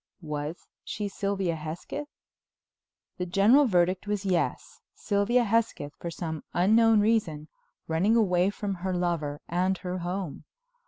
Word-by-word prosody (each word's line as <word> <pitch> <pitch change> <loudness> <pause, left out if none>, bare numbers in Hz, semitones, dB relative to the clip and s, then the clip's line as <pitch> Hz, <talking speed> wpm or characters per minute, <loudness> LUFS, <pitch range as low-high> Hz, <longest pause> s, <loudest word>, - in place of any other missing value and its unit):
Was 150 +2 -5 0.2
she 210 -1 -4
Sylvia 195 -3 -1
Hesketh? 160 - -6 1.1
The 180 - -2
general 220 +11 +5
verdict 185 -1 +1
was 205 -1 -2
yes—Sylvia 200 +5 0
Hesketh, 215 -10 0
for 170 - -4
some 160 -2 -5
unknown 220 +4 +5
reason, 190 -9 0 0.4
running 180 +8 +2
away 185 -4 +3
from 205 0 -3
her 185 0 -1
lover 165 -5 -1
and 185 +2 +1
her 180 0 -4
home. 180 -2 -4
185 Hz, 120 wpm, -27 LUFS, 170-205 Hz, 1.1 s, general